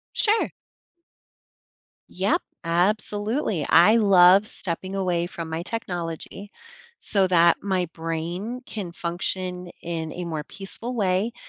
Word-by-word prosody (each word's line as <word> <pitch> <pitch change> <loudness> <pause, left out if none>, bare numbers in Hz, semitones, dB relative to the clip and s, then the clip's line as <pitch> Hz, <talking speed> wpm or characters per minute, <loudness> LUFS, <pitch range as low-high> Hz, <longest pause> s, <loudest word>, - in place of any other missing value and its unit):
Sure. 435 +1 +2 1.6
Yep, 190 +3 +1 0.2
absolutely, 205 - 0
I 175 +7 +7
love 195 -2 +6
stepping 185 0 -4
away 180 -3 0
from 165 -2 -7
my 160 +1 -3
technology 180 -1 -5 0.5
so 195 -2 +1
that 170 -2 +5
my 190 -3 0
brain 170 +9 -4
can 195 -6 -6
function 180 +1 -3
in 165 -2 -4
a 180 - -5
more 160 -3 -3
peaceful 225 +5 -7
way, 200 +1 +1
185 Hz, 110 wpm, -24 LUFS, 170-205 Hz, 1.6 s, I